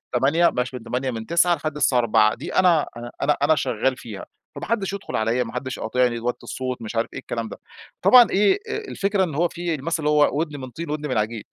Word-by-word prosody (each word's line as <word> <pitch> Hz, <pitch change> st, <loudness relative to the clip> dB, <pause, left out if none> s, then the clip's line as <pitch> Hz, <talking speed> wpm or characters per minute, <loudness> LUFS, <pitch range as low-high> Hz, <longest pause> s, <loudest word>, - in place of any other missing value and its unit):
8:00، 145 Hz, +8 st, +3 dB
بلاش 125 Hz, +1 st, -3 dB
من 125 Hz, -, -7 dB
8:00، 125 Hz, +3 st, -2 dB
من 110 Hz, -2 st, -6 dB
9:00 170 Hz, +4 st, +3 dB
لحد 155 Hz, 0 st, -4 dB
الساعة 140 Hz, -4 st, +2 dB
16:00، 110 Hz, -2 st, +3 dB
دي -, -, -7 dB
أنا 175 Hz, -5 st, +4 dB, 0.6 s
أنا 155 Hz, +2 st, +4 dB
شغّال 130 Hz, 0 st, 0 dB
فيها، 105 Hz, -6 st, -8 dB, 0.3 s
فما -, -, -6 dB
حدش 205 Hz, -4 st, -1 dB
يدخل 200 Hz, -, -6 dB
عليَّ، 115 Hz, +3 st, +1 dB
ما 115 Hz, -, -9 dB
حدش 130 Hz, -1 st, -4 dB
يقاطعني، 120 Hz, +1 st, 0 dB
وطوا 120 Hz, +1 st, -2 dB
الصوت، 130 Hz, -1 st, -5 dB
مش 115 Hz, +1 st, -7 dB
عارف 115 Hz, 0 st, 0 dB
إيه -, -, -5 dB
الكلام 115 Hz, -1 st, -5 dB
ده. -, -, -9 dB, 0.4 s
طبعًا 245 Hz, -2 st, +8 dB
إيه، 205 Hz, -, +3 dB
آآ، -, -, -2 dB
الفكرة 205 Hz, -, -1 dB
إن 160 Hz, -6 st, -3 dB
هو 175 Hz, +3 st, +2 dB
في 170 Hz, -1 st, -3 dB
المثل 160 Hz, +3 st, -2 dB
اللي 150 Hz, -, +2 dB
هو: 150 Hz, -1 st, +4 dB
"ودن 150 Hz, -3 st, -3 dB
من 130 Hz, -1 st, -7 dB
طين 160 Hz, +6 st, -7 dB
وودن 150 Hz, 0 st, -3 dB
من 130 Hz, -, 0 dB
عجين" 110 Hz, +1 st, -2 dB
135 Hz, 230 wpm, -23 LUFS, 120-170 Hz, 0.6 s, طبعًا